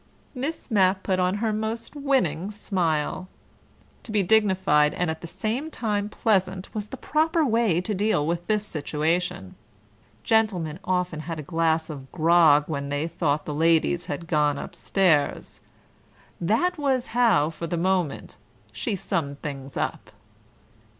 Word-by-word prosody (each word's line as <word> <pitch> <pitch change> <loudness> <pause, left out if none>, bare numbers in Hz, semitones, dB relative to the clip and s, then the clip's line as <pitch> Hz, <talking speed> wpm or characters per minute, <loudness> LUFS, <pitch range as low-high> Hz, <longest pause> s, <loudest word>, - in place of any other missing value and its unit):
Miss 275 +1 -5
Mapp 190 -2 +3
put 185 -1 0
on 180 +1 +2
her 220 +1 -1
most 220 +4 -4
winning 225 - 0
smile. 180 -4 -1 0.7
To - - -9
be 210 -2 +2
dignified 190 -7 +3
and 175 -2 0
at 160 - -7
the 170 - -7
same 220 - -3
time 210 -7 -2
pleasant 190 -4 0
was 210 -1 -4
the 265 - -8
proper 315 +2 +1
way 225 - +2
to 210 +3 -3
deal 200 -6 +1
with 170 +2 -2
this 210 -1 +1
situation. 155 - -2 0.7
Gentlemen 190 -8 +1
often 180 -3 -1
had 160 +1 -5
a 155 - -5
glass 160 0 +1
of 135 -4 -9
grog 160 -3 +5
when 140 -3 -3
they 145 +3 -1
thought 155 -3 -1
the 150 - -4
ladies 165 +3 +2
had 175 - -4
gone 150 -3 +1
upstairs. 170 -5 0 0.8
That 270 - +1
was 265 -3 +1
how, 225 -11 +3
for 165 +1 -6
the 170 - -2
moment, 180 -3 -1 0.3
she 220 - -2
summed 145 -6 -3
things 140 -3 -6
up. - - -3
180 Hz, 145 wpm, -25 LUFS, 160-215 Hz, 0.8 s, grog